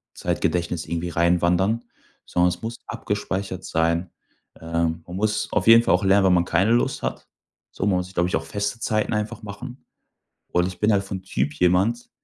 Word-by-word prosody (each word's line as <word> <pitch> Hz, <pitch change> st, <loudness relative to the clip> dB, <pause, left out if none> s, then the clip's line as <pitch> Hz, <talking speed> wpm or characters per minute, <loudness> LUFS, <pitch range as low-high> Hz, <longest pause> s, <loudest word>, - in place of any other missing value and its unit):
Zeitgedächtnis 85 Hz, -2 st, -1 dB
irgendwie 85 Hz, +1 st, -3 dB
reinwandern, 90 Hz, +6 st, +2 dB, 0.4 s
sondern 90 Hz, 0 st, +2 dB
es 90 Hz, 0 st, -5 dB
muss 115 Hz, +1 st, -4 dB
abgespeichert 100 Hz, -4 st, -3 dB
sein. 85 Hz, +2 st, 0 dB, 0.5 s
Ähm, 85 Hz, 0 st, -1 dB
man 90 Hz, -, -8 dB
muss 105 Hz, +2 st, 0 dB
auf 105 Hz, -1 st, 0 dB
jeden 115 Hz, +1 st, +8 dB
Fall -, -, +3 dB
auch -, -, +2 dB
lernen, 95 Hz, 0 st, +4 dB
wenn 95 Hz, -, +5 dB
man 85 Hz, -1 st, +3 dB
keine 95 Hz, +7 st, +2 dB
Lust 120 Hz, -, +1 dB
hat. -, -, -4 dB, 0.4 s
So, 95 Hz, -, -3 dB
man 95 Hz, -3 st, +2 dB
muss 90 Hz, -, -2 dB
sich, 95 Hz, -, -16 dB
glaube 90 Hz, 0 st, +1 dB
ich, -, -, 0 dB
auch -, -, -2 dB
feste 100 Hz, +2 st, -3 dB
Zeiten 110 Hz, -1 st, 0 dB
einfach 105 Hz, 0 st, -3 dB
machen. 120 Hz, +5 st, -9 dB, 0.7 s
Und 90 Hz, 0 st, +2 dB
ich 90 Hz, -1 st, -8 dB
bin 105 Hz, +1 st, +3 dB
halt 100 Hz, -1 st, +2 dB
vom 95 Hz, -1 st, -5 dB
Typ 75 Hz, -5 st, -1 dB
jemand, 90 Hz, +9 st, +1 dB
95 Hz, 190 wpm, -23 LUFS, 85-105 Hz, 0.7 s, jeden